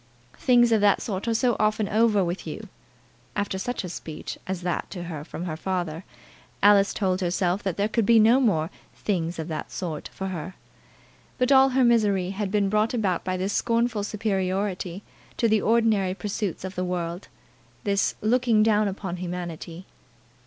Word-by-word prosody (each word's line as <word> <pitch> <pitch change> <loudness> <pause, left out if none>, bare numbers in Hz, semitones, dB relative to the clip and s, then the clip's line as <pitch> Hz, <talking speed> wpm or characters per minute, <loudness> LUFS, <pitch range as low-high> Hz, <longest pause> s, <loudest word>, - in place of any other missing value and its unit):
"Things 240 -2 +4
of 220 -2 +4
that 205 -1 +4
sort 195 0 -4
are 230 - +2
so 240 0 +2
often 215 0 +1
over 215 -1 +3
with 175 +2 -4
you!" - - -7 0.7
After 205 -2 -2
such 245 +3 -3
a 180 - -5
speech 160 -2 -7
as 185 -1 -3
that 175 -2 -2
to 175 -3 -6
her 160 -4 -6
from 170 +2 -6
her 160 -3 -3
father, 175 -1 -3 0.6
Alice 200 -1 +6
told 190 -2 0
herself 180 +1 0
that 190 -4 -3
there 205 +1 +2
could 220 -1 0
be 230 -1 +6
no 230 +4 +6
more 165 -10 +1 0.2
"things 175 -4 -2
of 160 -1 -4
that 155 -1 -5
sort" 165 -6 -4
for 190 0 -5
her. 180 0 -6 0.8
But 250 +1 +1
all 270 0 +7
her 260 0 +2
misery 205 -6 +3
had 200 0 -3
been 205 0 +1
brought 215 +4 +1
about 195 -7 0
by 185 0 -2
this 190 +2 -2
scornful 230 -2 +1
superiority 195 -2 -2 0.3
to 230 - +2
the 215 -1 +3
ordinary 220 -5 +2
pursuits 205 -3 -3
of 190 0 -5
the 180 - -2
world, 175 0 -3 0.6
this 200 -3 +1
looking 230 -1 +3
down 215 -1 +3
upon 190 -2 -4
humanity. 175 -1 -6
195 Hz, 175 wpm, -25 LUFS, 180-220 Hz, 0.8 s, all